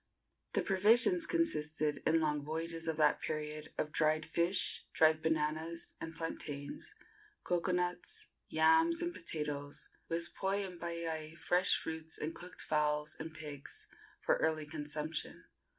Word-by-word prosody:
The -, -, +2 dB
provisions 235 Hz, -, +5 dB
consisted, 155 Hz, -, +1 dB
in 165 Hz, +1 st, +5 dB
long 150 Hz, -2 st, 0 dB
voyages 165 Hz, +2 st, -3 dB
of 160 Hz, -1 st, 0 dB
that 150 Hz, -1 st, +4 dB
period, 155 Hz, 0 st, -4 dB
of 150 Hz, -, -1 dB
dried 155 Hz, -1 st, +2 dB
fish, 170 Hz, +4 st, +1 dB
dried 155 Hz, 0 st, +5 dB
bananas 160 Hz, +1 st, -1 dB
and 165 Hz, 0 st, -5 dB
plantains, 145 Hz, -3 st, -5 dB, 0.5 s
cocoanuts, 180 Hz, -, 0 dB, 0.2 s
yams 330 Hz, +1 st, +5 dB
and 345 Hz, 0 st, -1 dB
potatoes, 150 Hz, -, -4 dB, 0.2 s
with 170 Hz, +1 st, -2 dB
poi 195 Hz, +1 st, 0 dB
and 180 Hz, -2 st, -9 dB
paiai, 165 Hz, -2 st, -3 dB
fresh 180 Hz, +2 st, +3 dB
fruits 160 Hz, 0 st, -5 dB
and 155 Hz, +2 st, -3 dB
cooked 180 Hz, +1 st, -5 dB
fowls 150 Hz, 0 st, +1 dB
and 160 Hz, 0 st, -6 dB
pigs, 150 Hz, -3 st, -7 dB, 0.3 s
for -, -, +2 dB
early 155 Hz, -1 st, +1 dB
consumption. 150 Hz, +1 st, -4 dB
160 Hz, 130 wpm, -35 LUFS, 150-175 Hz, 0.5 s, provisions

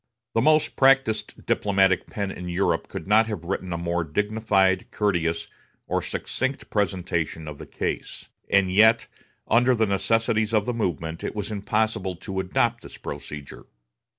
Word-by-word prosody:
The 115 Hz, -, +2 dB
most 155 Hz, +2 st, +3 dB
practised 135 Hz, -6 st, +2 dB
diplomatic 95 Hz, -2 st, +2 dB
pen 100 Hz, -2 st, -3 dB
in 90 Hz, -1 st, -6 dB
Europe 90 Hz, +3 st, 0 dB
could -, -, -7 dB
not 110 Hz, +2 st, +5 dB
have 105 Hz, -6 st, -4 dB
written 95 Hz, 0 st, -3 dB
a 85 Hz, -, -1 dB
more 85 Hz, 0 st, -1 dB
dignified, 95 Hz, +2 st, +1 dB
courteous, 85 Hz, -6 st, 0 dB, 0.4 s
or -, -, -1 dB
succinct 130 Hz, +2 st, -3 dB
presentation 85 Hz, -6 st, -1 dB
of 75 Hz, -2 st, -7 dB
the -, -, -9 dB
case; -, -, -4 dB, 0.2 s
and 95 Hz, -2 st, +3 dB
yet, 110 Hz, +3 st, +5 dB, 0.4 s
under 120 Hz, +3 st, +4 dB
the 110 Hz, -1 st, +2 dB
necessities 110 Hz, +2 st, +1 dB
of 105 Hz, -1 st, +2 dB
the 125 Hz, -, -1 dB
moment, 85 Hz, -7 st, -3 dB
it -, -, -4 dB
was 105 Hz, 0 st, -4 dB
impossible 105 Hz, -2 st, -1 dB
to 95 Hz, +2 st, -5 dB
adopt 115 Hz, +5 st, 0 dB
this -, -, -11 dB
procedure. 70 Hz, 0 st, -8 dB
100 Hz, 150 wpm, -25 LUFS, 90-110 Hz, 0.4 s, not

